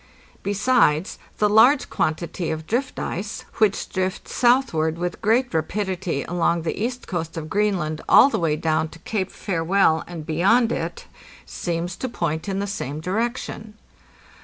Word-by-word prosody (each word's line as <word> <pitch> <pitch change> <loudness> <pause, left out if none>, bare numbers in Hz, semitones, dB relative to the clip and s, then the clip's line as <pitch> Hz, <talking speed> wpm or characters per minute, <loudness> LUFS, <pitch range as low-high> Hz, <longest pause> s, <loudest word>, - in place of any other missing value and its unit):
Besides, 200 -5 +2 0.2
the 210 - +3
large 245 +7 +5
quantity 170 +2 -1
of 160 0 -4
drift 250 +8 -2
ice, 205 +5 -4
which 215 -3 +2
drifts 185 -1 -3
southward 240 -11 +2
with 175 +1 -4
great 240 +3 +2
rapidity 180 -1 -2
along 170 -1 0
the 170 +5 -2
east 245 +1 -3
coast 165 -2 -4
of 155 -1 -6
Greenland 185 -7 0
all - - +8
the 280 - -1
way 160 -3 +1
down 160 0 0
to - - -13
Cape 190 +2 -3
Farewell 165 -2 +1
and 170 -3 -7
beyond 200 +10 +3
it, 485 - -4 0.4
seems 175 0 -3
to 260 - -3
point 165 -3 -2
in 195 - -2
the 200 - -1
same 155 -7 -4
direction. 220 +3 -3
185 Hz, 150 wpm, -23 LUFS, 160-215 Hz, 0.4 s, all